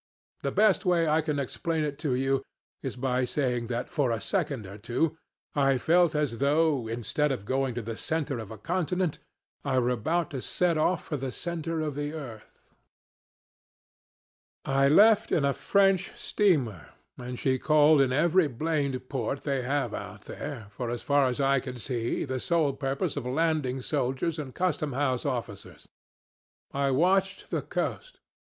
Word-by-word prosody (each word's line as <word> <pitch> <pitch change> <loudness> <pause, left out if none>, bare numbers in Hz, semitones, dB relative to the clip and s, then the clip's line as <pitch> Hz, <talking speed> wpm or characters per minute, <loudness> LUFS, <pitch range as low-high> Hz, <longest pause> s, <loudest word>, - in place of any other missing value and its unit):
The 140 - -1
best 210 +5 +3
way 175 -3 +2
I 155 +1 +3
can 150 -2 -2
explain 155 +4 -1
it 145 -1 -3
to 140 -5 0
you 135 +1 +1 0.4
is 135 - -4
by 125 0 0
saying 125 -2 -1
that, 120 0 -2
for 140 -4 0
a 115 -1 0
second 150 - -2
or 100 +2 -10
two, 125 +9 0 0.4
I 135 -2 +3
felt 170 +4 +3
as 145 -6 0
though, 145 -3 +2
instead 120 +6 0
of 105 -7 -3
going 130 0 0
to 120 - -3
the 115 +1 -5
center 150 -2 -2
of 110 -3 -7
a 110 - -8
continent, 180 - -1 0.4
I 135 -2 0
were 125 0 +2
about 160 +8 0
to 135 -3 -4
set 175 +4 +1
off 155 +2 +1
for 150 - -3
the 135 -1 -4
center 165 +1 -3
of 150 -2 -2
the 145 +2 -3
earth. 125 -9 -9 2.1
"I 135 0 +3
left 215 +7 +6
in 145 - +2
a 140 - +2
French 195 +3 +2
steamer, 130 - +1 0.3
and 125 0 -6
she 130 0 +1
called 150 0 +5
in 130 -2 +2
every 170 +5 +3
blamed 140 -1 -2
port 135 +1 -2
they 140 -3 0
have 140 +3 -1
out - - -7
there, 110 -3 -7
for, 120 +4 -4
as 120 0 -4
far 140 -2 +3
as 125 +1 -2
I 135 0 +3
could 125 -1 -7
see, 120 -1 -2
the 130 -2 -3
sole 160 -1 +1
purpose 135 0 -2
of 125 -3 -3
landing 140 -2 0
soldiers 135 +7 -1
and 135 -4 -6
custom 175 -6 0
house 130 0 0
officers. 120 -7 -5 0.9
I 140 0 +1
watched 190 +7 +1
the - - 0
coast. - - -4
140 Hz, 170 wpm, -28 LUFS, 125-160 Hz, 2.1 s, left